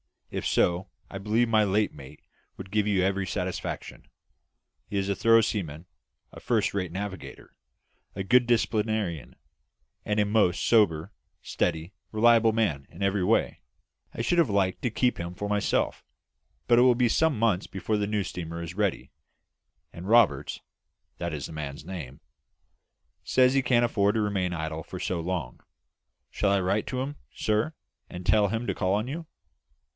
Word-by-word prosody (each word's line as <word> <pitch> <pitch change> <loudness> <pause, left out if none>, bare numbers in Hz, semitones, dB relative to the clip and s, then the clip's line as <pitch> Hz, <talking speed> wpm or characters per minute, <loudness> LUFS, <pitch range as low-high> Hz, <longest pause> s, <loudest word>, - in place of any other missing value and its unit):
If - - -3
so, 90 +2 +1 0.2
I 95 - -5
believe 110 +4 +1
my 110 -1 +4
late 105 +2 +1
mate 70 0 -12 0.4
would 95 0 -9
give 105 -1 +1
you 95 -3 +2
every 95 0 0
satisfaction. 90 -1 -4 0.8
He 100 - -3
is 100 0 -1
a 100 - +1
thorough 115 +2 +5
seaman, 85 -7 -3 0.5
a - - -11
first - - 0
rate 90 -4 -2
navigator, 95 +1 -7 0.6
a 95 - -3
good 120 +5 +4
disciplinarian, 110 - 0 0.7
and 105 0 0
a 105 - +3
most 100 -4 +2
sober, 95 -6 +3 0.3
steady, 85 +2 -2 0.2
reliable 115 0 +4
man 80 -12 0
in 90 +4 -7
every 100 -1 +1
way, 110 +4 +1 0.5
I - - -4
should 175 +9 +1
have 165 - +4
liked 95 -2 0
to 125 - +1
keep 125 +2 0
him 85 +1 -5
for 100 +2 -4
myself; 105 0 0 0.6
but 120 -1 +5
it - - +6
will 125 -1 +5
be 120 -1 +2
some 160 +1 +2
months 105 -5 +1
before 100 +3 -2
the 105 -1 -1
new 105 -1 0
steamer 85 -2 -6
will 85 - -5
be 85 - -7
ready, 100 -1 -1 0.8
and 85 +3 -9
Roberts 95 - +3 0.6
that 85 -1 -3
is 70 -3 -4
the - - -8
man's 75 -2 -6
name 75 -8 -8 1.0
says 130 0 +3
he 135 - +3
can't 125 -2 +3
afford 100 -3 +1
to 110 - +2
remain 95 -4 -1
idle 80 -1 -4
for 90 - -8
so 90 -1 -2
long. 85 -7 -4 0.7
Shall 100 - +1
I 100 -1 +2
write 100 +3 0
to 130 -1 -2
him, 145 +2 -5 0.2
sir, 110 +8 0 0.4
and 90 0 -8
tell 105 +2 +4
him 115 +4 -2
to - - -1
call 95 -1 0
on 105 +4 0
you?" 160 +4 -6
100 Hz, 170 wpm, -27 LUFS, 90-110 Hz, 1.0 s, it